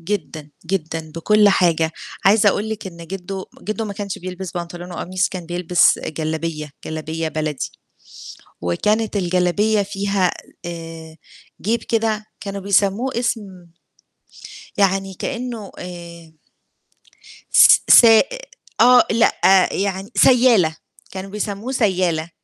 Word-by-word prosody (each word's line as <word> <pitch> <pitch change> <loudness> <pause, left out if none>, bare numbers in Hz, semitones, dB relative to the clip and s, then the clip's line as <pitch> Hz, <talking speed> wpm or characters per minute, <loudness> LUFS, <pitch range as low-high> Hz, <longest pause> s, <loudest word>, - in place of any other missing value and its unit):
جدًا، 165 -5 -5 0.2
جدًا 160 -3 -3
بكل 210 +5 +4
حاجة. 165 -4 +2 0.3
عايزة 205 +2 +5
أقول 205 +2 -1
لِك 220 -3 -5
إن 170 -2 -10
جِدّو 190 +1 -6 0.2
جِدّو 215 +1 -3
ما 205 - -5
كانش 200 -1 -5
بيلبس 185 0 -7
بنطلون 175 +1 -7
وقميص، 185 +2 -1
كان 180 -3 -7
بيلبس 175 0 +2
جلابية، 155 0 -4
جلابية 160 +1 -4
بلدي 155 -2 -3 0.9
وكانت 210 - 0
الجلابية 185 +3 +1
فيها 195 -2 0 0.3
آآ 165 -1 -8 0.5
جيب 230 +4 -1
كده 220 -2 -1
كانوا 200 -1 -6
بيسمّوه 200 +5 +1
اسم 200 -7 -4 1.1
يعني 195 -1 +1
كإنّه 235 -2 -5
آآ 170 -2 -10 1.2
س - - +7
سائ 225 -2 +8 0.5
آه، 245 0 +7
لأ، 195 -4 +4
يعني 195 +1 -3
سيّالة، 235 -11 +4 0.3
كانوا 190 +1 -7
بيسمّوه 210 +4 -4
سيّالة. 180 -8 0
190 Hz, 110 wpm, -20 LUFS, 170-210 Hz, 1.2 s, سائ